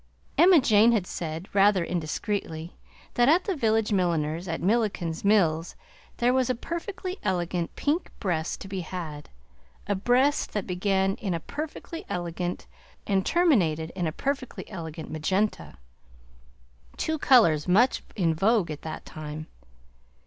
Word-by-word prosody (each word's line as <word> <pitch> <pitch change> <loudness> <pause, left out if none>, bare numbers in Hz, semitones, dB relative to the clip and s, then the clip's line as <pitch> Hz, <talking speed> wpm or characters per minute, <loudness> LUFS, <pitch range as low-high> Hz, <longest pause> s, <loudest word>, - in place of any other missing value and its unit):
Emma 355 -1 +7
Jane 225 -2 +5
had 205 -6 +1
said, 165 +1 -5
rather 195 -3 +4
indiscreetly, 165 0 -3 0.4
that 240 +2 +4
at 345 +4 +4
the 390 - -1
village 225 -5 +1
milliner's 170 -2 0
at 165 - -2
Milliken's 195 -5 0
Mills 175 -6 +2 0.4
there 245 +1 +3
was 260 -1 +2
a 255 - +1
perfectly 365 - -5
elegant 175 -2 -2
pink 305 +5 -1
breast 170 -5 -2
to - - -7
be 190 0 -4
had, 165 -4 -6 0.6
a 205 - 0
breast 245 +8 +2
that 210 -3 -2
began 190 +1 +1
in 190 -5 -2
a - - -2
perfectly 310 - -6
elegant 175 0 -3 0.4
solferino 205 - -2
and 190 -1 +2
terminated 180 - +2
in 180 -3 -2
a - - -1
perfectly 270 - -4
elegant 160 -4 -7
magenta; 190 - -1 1.2
two 315 -1 -1
colors 180 - +5
much 220 +8 +4
in 170 -6 +2
vogue 195 0 +2
at 150 - -7
that 160 -1 -7
time. 155 0 -7
190 Hz, 140 wpm, -26 LUFS, 165-240 Hz, 1.2 s, Emma